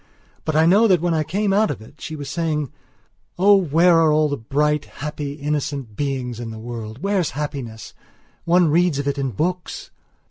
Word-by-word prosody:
But 155 - -1
I 160 +1 +5
know 200 +7 +5
that 185 -4 +4
when 175 +1 0
I 160 - +1
came 200 +5 0
out 215 +2 +3
of 140 - -3
it 110 - -16
she 155 - -6
was 145 -2 -7
saying: 150 -2 -2 0.7
"Oh, 200 +3 +6
where 170 -1 +4
are 160 -1 +4
all 155 0 +3
the 145 - -1
bright, 150 +4 0
happy, 145 -1 -6
innocent 145 -5 -3
beings 130 -4 -3
in 120 -1 -5
the 110 - -7
world? 115 - -7
Where's 195 -4 +1
happiness? 135 -7 -5 0.5
One 175 -1 +4
reads 170 -1 +2
of 140 0 -2
it 140 0 -1
in 135 -1 -1
books!" 175 - -3
150 Hz, 190 wpm, -21 LUFS, 135-170 Hz, 0.7 s, Oh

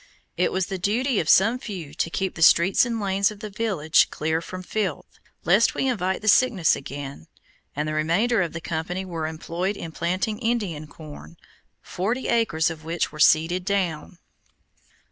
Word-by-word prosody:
It - - +1
was 185 0 0
the 190 0 -5
duty 230 +6 0
of 155 - -2
some 225 +6 +5
few 180 - -7
to 165 - -1
keep 190 +2 -2
the 160 - -9
streets 180 +7 +5
and 230 -1 -2
lanes 200 0 +1
of 210 -2 -10
the 210 -1 -7
village 190 -8 +2
clear 160 +1 -1
of 185 +2 -8
filth, 195 -8 -4 0.2
lest 195 +7 +3
we 270 - 0
invite 190 -6 -1
the - - -5
sickness 210 -6 +4
again, 135 - -8 0.5
and 150 +2 -2
the 155 - -2
remainder 180 +10 +1
of 170 - -2
the 165 - -6
company 175 +3 -4
were 165 -3 -4
employed 170 +5 -3
in 165 - -7
planting 185 +7 -2
Indian 205 -11 -2
corn, 145 - -12 0.5
forty 225 +8 -2
acres 175 -8 +1
of 160 -1 -9
which 165 +2 -2
were 155 - -11
seeded 165 +4 +4
down. 180 -4 -2
180 Hz, 175 wpm, -24 LUFS, 160-210 Hz, 0.5 s, some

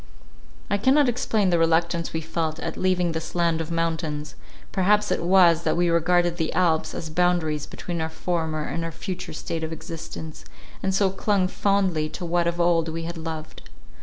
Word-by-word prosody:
I 205 - 0
cannot 270 +5 +4
explain 225 -5 +1
the 170 - +3
reluctance 165 +1 +1
we 160 - -2
felt 160 0 -2
at - - -4
leaving 180 -2 +1
this 160 +1 -5
land 170 -2 +2
of 160 - -5
mountains; 160 -3 -2 0.4
perhaps 205 +2 +2
it - - 0
was, 175 -2 +5
that - - 0
we 175 0 +3
regarded 175 +1 +2
the 160 -2 -1
Alps 165 -3 +1
as 160 - -5
boundaries 160 -3 +1
between 170 -2 -5
our 160 - -1
former 160 -2 -2
and 165 +2 -3
our 165 - -3
future 185 +2 -6
state 160 +1 -4
of 160 - -3
existence, 160 -1 -7 0.4
and 190 0 0
so 195 -1 +3
clung 195 -1 +1
fondly 185 -6 +1
to 180 - -6
what 170 0 +1
of 170 0 -1
old 170 -1 +3
we 165 +1 -4
had 170 +1 -5
loved. 160 -1 -7
170 Hz, 185 wpm, -24 LUFS, 160-180 Hz, 0.4 s, was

